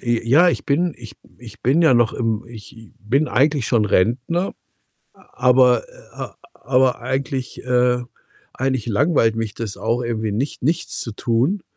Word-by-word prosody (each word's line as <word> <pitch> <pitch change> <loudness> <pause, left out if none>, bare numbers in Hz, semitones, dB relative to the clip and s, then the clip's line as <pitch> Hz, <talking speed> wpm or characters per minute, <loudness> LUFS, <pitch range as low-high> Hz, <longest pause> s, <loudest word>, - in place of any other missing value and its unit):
J 120 -2 -1
ja, 160 +9 +5
ich - - -1
bin 165 +3 0
ich 115 -3 -11 0.2
ich 115 -4 -13
bin 135 +7 +3
ja 160 -6 +5
noch 120 -2 +3
im 115 -2 -2
ich 115 -1 -12
i 115 -1 -15
bin 135 +9 0
eigentlich 140 -2 +1
schon 115 -4 +2
Rentner, 125 - 0 0.6
aber 125 -1 +2
äh, - - -10 0.3
aber 130 0 +1
eigentlich, 130 +1 -4
äh 125 -1 +2 0.5
eigentlich 130 -3 -1
langweilt 115 0 +2
mich 115 -2 -4
das 110 -4 -5
auch 115 +2 -1
irgendwie 110 -2 -2
nicht 125 +7 -3
nichts 160 +5 -1
zu 115 - -4
tun. 125 - 0
125 Hz, 160 wpm, -20 LUFS, 115-135 Hz, 0.6 s, ja